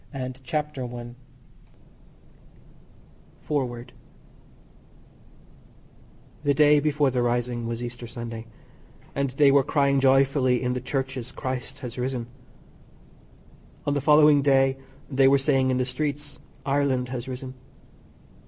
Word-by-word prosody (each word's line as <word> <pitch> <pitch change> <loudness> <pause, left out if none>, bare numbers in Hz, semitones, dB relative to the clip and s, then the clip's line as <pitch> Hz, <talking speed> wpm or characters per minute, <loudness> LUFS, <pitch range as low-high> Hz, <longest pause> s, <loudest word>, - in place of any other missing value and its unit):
THE 140 - -8
IRISH 130 0 -5
QUESTIONS 125 -6 -4 2.3
FOREWORD 125 -5 -3 2.5
The 145 -1 +3
day 150 0 +5
before 145 -2 +1
the 125 -1 0
rising 120 -1 -1
was 115 +1 -4
Easter 120 0 -6
Sunday, 115 -1 -7 0.7
and 140 -1 -1
they 140 +2 +4
were 140 0 +5
crying 140 0 +2
joyfully 135 -1 +3
in 125 0 0
the 125 - -3
Churches 130 -1 -3
"Christ 130 -1 -5
has 120 +1 -7
risen." 125 -1 -2 1.6
On 145 - +1
the 145 - 0
following 150 0 +6
day 135 -1 +3 0.3
they 135 -1 +3
were 140 +1 +5
saying 135 -1 +2
in 130 - +1
the 125 - +1
streets 145 +2 -4 0.3
"Ireland 135 -3 +1
has 125 0 -5
risen." 130 0 -6
130 Hz, 115 wpm, -25 LUFS, 125-140 Hz, 2.5 s, following